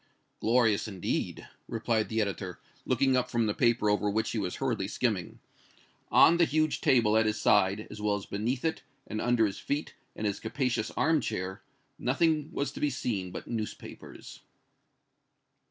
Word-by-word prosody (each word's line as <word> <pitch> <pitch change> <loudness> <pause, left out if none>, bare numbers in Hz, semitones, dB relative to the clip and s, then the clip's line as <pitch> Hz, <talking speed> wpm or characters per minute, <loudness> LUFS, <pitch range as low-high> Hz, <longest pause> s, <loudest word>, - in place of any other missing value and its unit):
"Glorious, 115 -3 +2
indeed!" 95 -4 -3 0.2
replied 115 -1 -1
the 110 0 +1
editor, 95 -3 -3 0.3
looking 130 +1 +3
up 125 - +1
from 115 -1 +1
the 105 - 0
paper 115 -2 +2
over 105 0 +2
which 110 +2 0
he 115 - -1
was 90 -3 -2
hurriedly 120 -8 -1
skimming. 105 -5 -2 0.7
On 170 - +7
the 170 - +5
huge 155 0 0
table 115 -4 +4
at 110 0 +4
his 110 +1 -1
side, 100 +1 +3
as 105 - -8
well 105 -1 +1
as 100 - -5
beneath 120 +7 -2
it, 160 - -1 0.2
and 110 0 -4
under 120 -2 +3
his 100 - -3
feet 145 +2 -3 0.2
and 110 - -4
his 100 -2 -1
capacious 120 -1 -1
arm 160 -1 +3
chair, 95 +1 -4 0.4
nothing 155 +3 +1
was 140 - -2
to - - -9
be 150 - +2
seen 110 -8 -2
but - - -8
newspapers. 110 -2 -7
110 Hz, 170 wpm, -29 LUFS, 105-130 Hz, 0.7 s, On